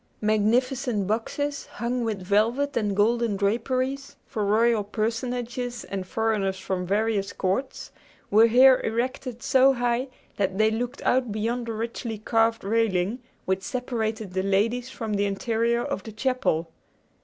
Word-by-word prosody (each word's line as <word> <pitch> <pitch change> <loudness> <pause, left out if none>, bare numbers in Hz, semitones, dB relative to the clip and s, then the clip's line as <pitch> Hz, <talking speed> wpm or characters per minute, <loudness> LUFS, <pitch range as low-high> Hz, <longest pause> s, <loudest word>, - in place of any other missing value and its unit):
Magnificent 220 +1 +1
boxes, 280 +7 -2
hung 240 +2 -2
with 215 -4 -3
velvet 230 +9 +1
and 205 -3 0
golden 225 0 +2
draperies 255 +6 -1
for 215 - -3
royal 220 +2 +3
personages 240 +3 -3
and 190 -2 -5
foreigners 210 -3 0
from 185 -1 -3
various 205 0 0
courts, 195 +9 -2 0.4
were 220 +3 +7
here 255 +3 +6
erected 245 +1 -3
so 265 +1 +5
high 245 +1 0 0.3
that 190 -1 0
they 215 +1 +4
looked 245 +4 -3
out 250 -3 +2
beyond 230 +3 -2
the 230 - -2
richly 225 0 -4
carved 225 +1 +1
railing 210 0 +1 0.3
which 190 0 0
separated 220 -4 -3
the 190 - 0
ladies 220 +6 +1
from 225 -4 -4
the 205 0 +1
interior 230 +3 0
of - - -3
the 220 - -9
chapel. 215 -8 0
225 Hz, 140 wpm, -25 LUFS, 205-245 Hz, 0.4 s, were